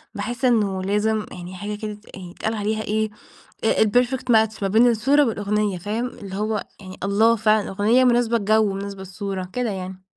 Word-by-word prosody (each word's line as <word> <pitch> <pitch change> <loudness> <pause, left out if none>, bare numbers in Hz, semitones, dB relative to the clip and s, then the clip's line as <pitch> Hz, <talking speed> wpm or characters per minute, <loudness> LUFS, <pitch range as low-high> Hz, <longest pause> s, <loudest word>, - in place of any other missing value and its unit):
باحس 245 +2 -3
إنه 205 -6 +2
لازم 210 +2 0
يعني 180 +1 -8
حاجة 205 +3 -5
كده 210 0 -5
ت 210 +1 -15
يعن 190 - -9
يتقال 220 +5 -3
عليها 215 0 -1
إيه؟ 215 +1 -1 0.6
آآ 220 - +3
الPerfect 245 +4 +1
match 220 -1 +2
ما 195 - +1
بين 225 +5 +5
الصورة 270 +6 +3
والأغنية 210 -3 -1
فاهم؟ 215 +7 -2
اللي 200 -6 -9
هو 215 0 -1 0.2
يعني 185 -1 -10
الله 220 +4 +3
فعلًا 215 -1 +2
أغنية 215 +6 +3
مناسبة 240 -1 +3
الجو 215 +1 +3
ومناسبة 195 0 -5
الصورة 190 0 -5
كده 250 -2 -1
يعني. 190 -1 -6
210 Hz, 185 wpm, -22 LUFS, 200-225 Hz, 0.6 s, بين